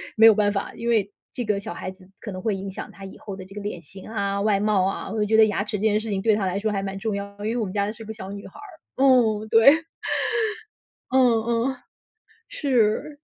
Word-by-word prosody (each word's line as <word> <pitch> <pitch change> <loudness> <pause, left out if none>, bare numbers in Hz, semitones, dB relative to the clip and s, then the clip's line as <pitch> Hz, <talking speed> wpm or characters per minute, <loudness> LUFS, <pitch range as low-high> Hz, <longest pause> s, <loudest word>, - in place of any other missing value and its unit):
没 225 - +6
有 225 - +10
办 205 -1 +2
法， 200 - -3
因 235 - -5
为， 215 -4 +2 0.2
这 245 - -3
个 210 -3 0
小 200 - -6
孩 185 - -5
子 190 0 -18
可 205 - -6
能 185 0 -6
会 210 -1 0
影 195 0 -5
响 - - -7
她 195 - -13
以 190 - -9
后 200 -3 -7
的 190 - -8
这 195 - -14
个 205 - -5
脸 200 -4 -5
型 190 +4 -11
啊， 200 -2 -1
外 205 -1 +2
貌 205 -3 +2
啊， 195 - -3
我 220 - -3
就 210 - +2
觉 220 +1 +2
得 220 - +8
牙 200 -1 -1
齿 210 - -3
这 - - -7
件 215 -1 +3
事 225 - -6
情 195 -2 -1
对 215 0 +3
她 205 - -1
来 185 +1 -1
说 215 +1 -1
还 195 - -1
蛮 195 0 -4
重 215 +1 -2
要 200 0 -6
的， 205 - -6
因 220 - 0
为 240 - -2
我 225 - 0
们 185 - -6
家 200 -1 +1
的 210 - -2
是 225 0 -9
个 220 - -6
小 195 -3 -8
女 200 0 -8
孩 - - -16
儿。 325 -8 -6
哦， 225 -5 +4
对。 225 +4 +8 1.4
嗯 245 -4 +4
嗯， 235 +3 0 0.7
是。 260 +1 +1
210 Hz, 290 characters per minute, -24 LUFS, 195-225 Hz, 1.4 s, 有